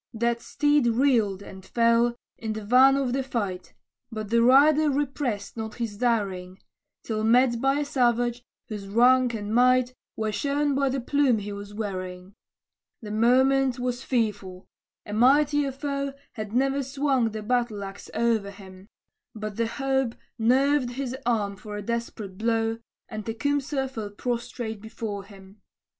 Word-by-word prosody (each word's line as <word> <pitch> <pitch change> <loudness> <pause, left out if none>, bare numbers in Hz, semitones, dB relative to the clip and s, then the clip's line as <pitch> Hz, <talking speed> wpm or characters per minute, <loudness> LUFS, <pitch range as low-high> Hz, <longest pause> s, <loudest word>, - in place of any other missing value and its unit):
That 235 +1 0
steed 290 -2 +2
reeled, 225 -5 +2
and 190 -1 -11
fell, 235 +3 +2 0.2
in 220 -1 -4
the 215 -1 -6
van 260 +4 +6
of 265 -3 -1
the 270 - 0
fight, 205 -8 -4 0.4
But 215 -1 -6
the 235 0 +4
rider 290 +5 +5
repressed 270 -7 -2
not 220 -1 -5
his 230 -4 -4
daring, 195 -6 -1 0.5
Till 215 -1 -2
met 235 +1 +3
by 270 +2 +2
a - - -2
savage, 245 -3 +1 0.3
whose 205 -3 -6
rank 245 +3 +4
and 210 0 -4
might 250 +1 +4 0.2
Were 220 -1 -1
shown 285 +5 0
by 275 0 +1
the 265 +1 -1
plume 270 -1 +2
he 205 0 -5
was 205 0 -8
wearing. 185 -3 -5 0.7
The 210 - -6
moment 260 +3 +3
was 245 0 -2
fearful; 205 -8 -2 0.4
a 210 - -7
mightier 280 +4 +3
foe 280 0 -3 0.2
Had 215 -3 -6
ne'er 270 +3 +1
swung 270 -3 0
the 215 -1 -6
battle 235 -3 0
axe 195 +1 -9
o'er 225 -4 +1
him; 190 -1 -13 0.5
But 215 0 -6
hope 265 +1 0 0.2
nerved 260 +2 +2
his 260 -1 -4
arm 205 -4 0
for 210 0 -7
a 205 - -5
desperate 220 -4 -4
blow, 225 0 0 0.3
And 215 -1 -6
Tecumseh 270 +4 -1
fell 225 -6 -6
prostrate 230 0 -4
before 215 -2 -6
him. 195 0 -16
235 Hz, 150 wpm, -26 LUFS, 210-265 Hz, 0.7 s, van